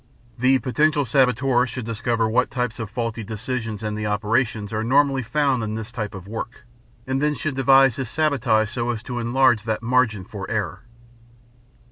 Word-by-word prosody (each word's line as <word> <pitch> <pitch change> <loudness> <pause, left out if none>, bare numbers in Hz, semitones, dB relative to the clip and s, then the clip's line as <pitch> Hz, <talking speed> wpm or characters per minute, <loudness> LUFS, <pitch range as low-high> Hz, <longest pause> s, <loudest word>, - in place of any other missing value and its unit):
The 130 +2 +4
potential 145 +3 +1
saboteur 125 0 +2
should 120 0 -6
discover 115 0 0
what 125 +3 +1
types 125 -3 -3
of 115 -2 -4
faulty 115 0 -3
decisions 110 0 -4
and 105 -1 -2
the 105 0 -3
operations 110 0 0
are 110 +1 -1
normally 135 +2 +3
found 135 +1 +1
in 110 -1 -3
this 110 +1 -6
kind 105 -5 -5
of 95 0 -9
work 115 +2 -7 0.4
and 130 +1 -1 0.2
should 155 +1 -2
then - - -10
devise 135 -2 +5
his 130 -4 -3
sabotage 120 -8 +1
so 120 -1 -2
as 115 -2 -3
to 120 -1 -4
enlarge 120 -1 +3
that 110 0 -2
"margin 115 -5 +1
for 100 -2 -7
error." 105 -8 -2
120 Hz, 175 wpm, -23 LUFS, 110-130 Hz, 0.4 s, devise